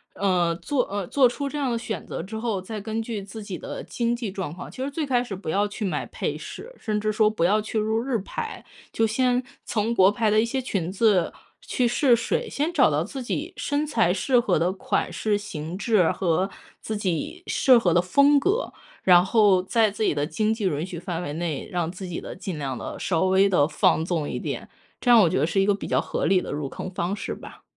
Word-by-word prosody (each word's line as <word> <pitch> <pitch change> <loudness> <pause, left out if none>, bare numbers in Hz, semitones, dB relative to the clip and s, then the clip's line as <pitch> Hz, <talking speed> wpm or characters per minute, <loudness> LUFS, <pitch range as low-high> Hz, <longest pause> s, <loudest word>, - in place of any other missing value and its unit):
呃， 180 -4 +1
做 270 - 0
呃， 200 -1 -3
做 270 +4 +4
出 275 +3 -3
这 295 - -5
样 280 -3 0
的 235 - 0
选 230 -1 -5
择 - - -4
之 220 +3 -6
后， 220 -5 -2
再 215 +3 -6
根 220 +2 -3
据 220 -3 -4
自 205 +3 -9
己 195 -3 -5
的 - - -7
经 235 0 -1
济 235 -4 -4
状 185 -6 -4
况， 175 - -9
其 255 - -8
实 270 - -1
最 300 +2 -2
开 250 -3 +2
始 215 -6 -5
不 185 -4 -7
要 200 +5 +2
去 205 +1 -6
买 190 - -1
配 - - -3
饰， - - -9
甚 215 -2 -1
至 215 0 0
说 215 0 +3
不 215 -6 -2
要 210 +5 +3
去 220 +1 -4
入 220 +1 +1
日 255 -1 0
牌。 445 - -6 0.3
就 225 - +2
先 250 +3 +1 0.2
从 220 +1 0
国 190 -3 +6
牌 215 0 +1
的 215 - +4
一 225 - +3
些 260 +3 -2
裙 190 -9 -2
子 195 -2 +2 0.3
去 260 - -1
试 245 +1 +4
水， 235 - -1
先 300 +4 -1
找 275 -6 +4
到 150 +1 +1
自 265 +9 -6
己 320 +8 -3
身 290 +1 -1
材 225 - +2
适 245 +6 +2
合 240 - +2
的 170 +4 +1
款 190 - -1
式、 210 -2 0
型 165 -4 -6
质 205 -5 +3
和 185 +1 0 0.3
自 220 - -4
己 205 - -3
适 260 -3 +5
合 185 -7 +2
的 175 - +4
风 280 +10 +4
格， 405 - 0 0.3
然 180 -1 +7
后 200 -3 +4
在 220 +3 +3
自 210 - -3
己 - - +2
的 145 0 0
经 215 +7 0
济 220 -2 -3
允 160 -2 0
许 180 -2 -7
范 175 -1 -4
围 145 -4 -4
内， 160 -3 -3
让 175 -4 -1
自 185 +1 -7
己 175 - -5
的 - - -7
尽 185 -2 -5
量 135 -3 -3
地、 - - -6
稍 170 -2 0
微 190 +1 +4
地 150 -6 +3
放 160 - +2
纵 165 -4 -1
一 - - -3
点， - - -5 0.3
这 245 - 0
样 235 - +9
我 175 - +4
觉 - - 0
得 145 - +3
是 170 +4 0
一 195 - +4
个 205 - +3
比 200 - -7
较 - - +2
合 - - -2
理 190 -1 +3
的 - - -6
入 145 -1 -3
坑 185 - -6
方 180 0 -2
式 205 - -4
吧。 - - -12
205 Hz, 265 characters per minute, -25 LUFS, 180-235 Hz, 0.3 s, 样